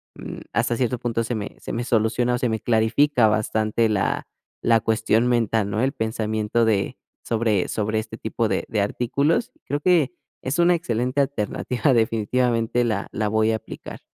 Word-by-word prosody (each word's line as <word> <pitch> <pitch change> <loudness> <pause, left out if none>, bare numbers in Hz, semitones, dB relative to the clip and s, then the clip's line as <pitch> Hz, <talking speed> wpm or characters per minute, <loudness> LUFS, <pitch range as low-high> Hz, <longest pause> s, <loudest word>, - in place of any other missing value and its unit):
mm, - - -8
hasta 120 0 +1
cierto 125 -1 0
punto 115 -1 -1
se 120 - -3
me 105 -2 -5
se - - -6
me 120 - -2
soluciona 120 +2 +1
o - - -1
se 125 -2 0
me 110 - -1
clarifica 115 +3 +3
bastante 110 +1 +1
la 100 -3 0 0.3
la 115 -1 +4
cuestión 110 +1 +2
mental, 115 -4 +1
¿no?, 110 +4 0
el 135 - +2
pensamiento 110 -1 0
de 105 -3 0 0.3
sobre 110 -5 +1
sobre 110 0 -1
este 110 +1 -7
tipo 110 +1 -1
de - - -1
de 110 -3 0
artículos. 140 - 0
Creo 145 +1 -2
que 170 -3 +3 0.3
es 130 +5 -2
una 175 +1 +5
excelente 125 -4 -1
alternativa, 125 0 0
definitivamente 115 +1 +1
la 110 -4 -1
la 110 0 -1
voy 110 +1 +2
a - - +1
aplicar. 110 - -9
115 Hz, 175 wpm, -23 LUFS, 110-125 Hz, 0.3 s, una